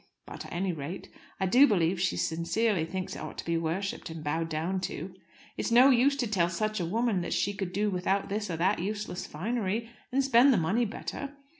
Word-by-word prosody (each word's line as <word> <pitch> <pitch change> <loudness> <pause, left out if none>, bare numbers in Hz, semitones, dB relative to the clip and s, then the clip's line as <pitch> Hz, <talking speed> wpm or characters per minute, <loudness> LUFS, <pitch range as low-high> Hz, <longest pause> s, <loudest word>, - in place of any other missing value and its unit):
But, - - -8
at - - -14
any 180 +1 -1
rate, 160 +4 -6 0.3
I 190 - +1
do 250 +10 +6
believe 180 -4 +1
she 90 - +1
sincerely 170 - 0
thinks 185 +2 -4
it - - -7
ought - - -7
to - - -6
be 170 - 0
worshipped 165 +5 -2
and 160 -1 -7
bowed 165 +2 -1
down 165 +4 -1
to. 180 +4 -6 0.4
It's - - -1
no 250 +4 +7
use 265 +3 +4
to 255 -4 -1
tell 180 -5 +1
such 215 +5 -1
a 175 - -1
woman 220 0 +1
that 170 - -3
she 200 - 0
could 195 -3 -4
do 205 +2 0
without 190 +2 0
this 205 0 -3
or 165 - -2
that 190 +5 +2
useless 205 0 -4
finery, 225 +5 -2 0.2
and 275 +2 +2
spend 265 +1 +6
the 240 - +4
money 195 +8 +1
better. 280 +6 -6
195 Hz, 215 wpm, -29 LUFS, 170-225 Hz, 0.4 s, no